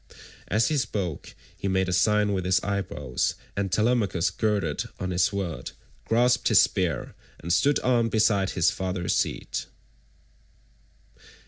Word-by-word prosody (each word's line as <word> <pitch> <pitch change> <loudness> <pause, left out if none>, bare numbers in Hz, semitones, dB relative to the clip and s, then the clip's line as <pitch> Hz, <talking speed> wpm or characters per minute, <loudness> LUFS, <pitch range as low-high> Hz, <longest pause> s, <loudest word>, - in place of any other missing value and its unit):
As 110 +3 +2
he 155 - 0
spoke 90 - -4 0.2
he - - -4
made 95 -1 +1
a 90 - -1
sign 105 +3 +3
with 95 -2 -1
his 90 0 +2
eyebrows, 85 -10 -2 0.2
and 100 -2 -2
Telemachus 105 -6 +1
girded 100 -9 -1
on 95 0 -3
his 90 0 +3
sword, 100 -5 -4 0.3
grasped 120 +2 +2
his 110 - +6
spear, 90 - -1 0.2
and 85 +3 -2
stood 140 +11 +3
armed 120 -2 +2
beside 105 -3 +2
his 90 - +2
father's 90 -2 -2
seat. - - -2
95 Hz, 135 wpm, -26 LUFS, 90-110 Hz, 0.3 s, his